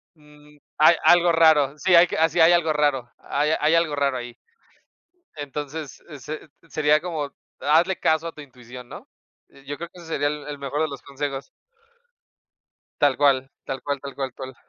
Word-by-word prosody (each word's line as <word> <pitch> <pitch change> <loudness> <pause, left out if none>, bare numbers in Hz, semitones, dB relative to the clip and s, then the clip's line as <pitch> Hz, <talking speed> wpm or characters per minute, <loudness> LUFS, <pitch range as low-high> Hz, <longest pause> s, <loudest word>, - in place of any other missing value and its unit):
mm, 150 -1 -20 0.2
hay 155 +3 +6
algo 175 0 +5
raro. 155 -4 +4
Sí, 175 +4 +3
hay 170 +1 +7
que - - -4
así 165 +2 +2
hay 165 +1 +7
algo 170 -3 +2
raro, 145 -5 0
hay 150 +2 -1
hay 155 +2 +3
algo 165 -3 +1
raro 140 -2 0
ahí. 120 -1 -8 1.0
Entonces, 145 0 -7
eh, 150 -3 -10
se 155 +4 -8 0.2
sería 150 0 +2
como, 155 -5 -4 0.3
hazle 170 +5 +3
caso 160 +1 +1
a - - -5
tu 150 - -11
intuición, 125 -2 -13
¿no? - - -11 0.6
Yo 145 +1 -6
creo 170 - -6
que 180 - -16
ese 170 - -12
sería 145 -3 -1
el 150 0 -5
el 145 -1 -6
mejor 140 +2 -3
de 160 - +1
los 140 -3 -8
consejos. 140 0 -5 1.5
Tal 145 -2 +3
cual, 135 -2 +2
tal 135 -1 -5
cual, 145 -1 -3
tal 140 0 -8
cual, 135 -2 -4
cual. 130 -1 -8
150 Hz, 185 wpm, -23 LUFS, 140-160 Hz, 1.5 s, hay